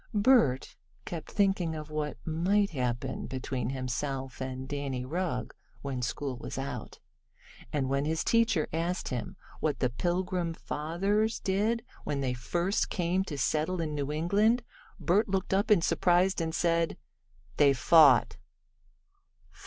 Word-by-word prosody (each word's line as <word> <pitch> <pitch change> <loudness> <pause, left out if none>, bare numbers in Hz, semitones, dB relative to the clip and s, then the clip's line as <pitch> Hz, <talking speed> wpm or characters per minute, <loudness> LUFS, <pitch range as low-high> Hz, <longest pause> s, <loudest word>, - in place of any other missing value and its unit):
Bert 205 - +3 0.3
kept 170 -3 -6
thinking 190 -5 +1
of 155 0 -7
what 150 -2 -3
might 185 +5 +1
happen 130 -2 -2
between 130 -2 -3
himself 130 0 -3
and 130 0 -4
Danny 140 -3 -3
Rugg 155 -3 -2 0.3
when 135 -3 -3
school 130 +2 -3
was 120 - -7
out, 135 -4 -5 0.7
and 140 -3 0
when 140 +1 0
his 160 +1 0
teacher 225 -8 +2
asked 170 +3 -1
him 120 -5 -4 0.2
what 155 -2 0
the 125 - 0
Pilgrim 175 +3 -1
Fathers 195 +10 -1
did 215 +4 0 0.2
when 145 - -2
they 130 -2 0
first 175 - -1
came 180 +1 0
to 145 - -5
settle 155 +6 0
in 155 -2 -2
New 145 -1 -2
England 205 +10 +2 0.4
Bert 195 +5 +2
looked 190 0 -1
up 200 +3 +2
in 200 -6 +5
surprise, 180 +2 +3
and 160 0 -2
said: 170 -1 +1 0.6
"They 145 -2 +6
fought." 145 +2 +5
160 Hz, 135 wpm, -29 LUFS, 135-185 Hz, 0.7 s, They